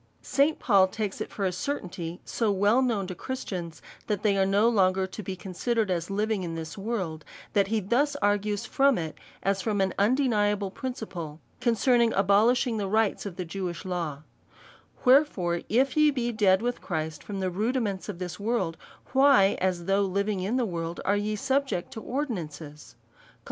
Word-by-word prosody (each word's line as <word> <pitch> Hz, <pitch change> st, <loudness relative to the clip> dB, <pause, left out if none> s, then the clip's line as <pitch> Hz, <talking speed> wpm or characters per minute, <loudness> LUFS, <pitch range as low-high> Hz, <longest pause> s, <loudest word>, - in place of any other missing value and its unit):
St. 295 Hz, +3 st, +2 dB
Paul 195 Hz, -5 st, +4 dB
takes 205 Hz, 0 st, -4 dB
it -, -, -3 dB
for 200 Hz, -, -3 dB
a 185 Hz, -, +1 dB
certainty 180 Hz, -, -4 dB
so 225 Hz, -3 st, 0 dB
well 205 Hz, +6 st, +3 dB
known 230 Hz, -7 st, 0 dB
to 185 Hz, -, -5 dB
Christians, 180 Hz, -7 st, -6 dB, 0.2 s
that 210 Hz, -3 st, -1 dB
they 205 Hz, -2 st, +3 dB
are 195 Hz, -1 st, +2 dB
no 200 Hz, +3 st, +3 dB
long*er 190 Hz, -4 st, +3 dB
to 190 Hz, +3 st, -7 dB
be 190 Hz, -2 st, -5 dB
considered 200 Hz, +4 st, -1 dB
as 170 Hz, 0 st, -2 dB
living 210 Hz, +1 st, 0 dB
in 170 Hz, -2 st, -4 dB
this 160 Hz, -1 st, -6 dB
world, 195 Hz, -7 st, -3 dB, 0.3 s
that 200 Hz, -1 st, +3 dB
he 220 Hz, +2 st, +1 dB
thus 245 Hz, +9 st, +1 dB
argues 205 Hz, 0 st, 0 dB
from 275 Hz, -1 st, +3 dB
it, 160 Hz, -3 st, -4 dB, 0.3 s
as 195 Hz, 0 st, +1 dB
from 210 Hz, -1 st, -1 dB
an 190 Hz, -1 st, +1 dB
undeniable 210 Hz, -4 st, +2 dB
principle, 190 Hz, -, -6 dB, 0.2 s
concerning 240 Hz, 0 st, +3 dB
the -, -, -3 dB
abohsh 210 Hz, +6 st, +4 dB
ing 235 Hz, -3 st, -1 dB
the 200 Hz, -2 st, -2 dB
rites 215 Hz, 0 st, +1 dB
of 185 Hz, -, -7 dB
the 180 Hz, -, -4 dB
Jewish 175 Hz, 0 st, -5 dB
law: 165 Hz, -6 st, -3 dB, 0.8 s
Wherefore 250 Hz, -, +4 dB
if 255 Hz, +4 st, +2 dB
ye 305 Hz, -1 st, +5 dB
be 245 Hz, -4 st, -1 dB
dead 200 Hz, -4 st, +3 dB
loitli 245 Hz, +1 st, -2 dB
Christ 160 Hz, -3 st, -4 dB
from 200 Hz, -2 st, -5 dB
the 185 Hz, -1 st, -1 dB
rudiments 210 Hz, 0 st, -1 dB
of 195 Hz, -, -5 dB
the 180 Hz, -2 st, -5 dB
world, 200 Hz, -6 st, -1 dB, 0.4 s
tchj/, 265 Hz, -7 st, +5 dB
as 180 Hz, -2 st, -1 dB
though 195 Hz, +2 st, +2 dB
living 200 Hz, +1 st, 0 dB
in 195 Hz, +6 st, -1 dB
the 250 Hz, -, +1 dB
world, 170 Hz, -3 st, -4 dB
are 200 Hz, -, +3 dB
ye 210 Hz, +1 st, -1 dB
subject 265 Hz, -3 st, -1 dB
to 220 Hz, -, -7 dB
ordinances 165 Hz, -, -5 dB
/ -, -, -30 dB
Col. -, -, -28 dB
200 Hz, 185 wpm, -27 LUFS, 185-235 Hz, 0.8 s, ye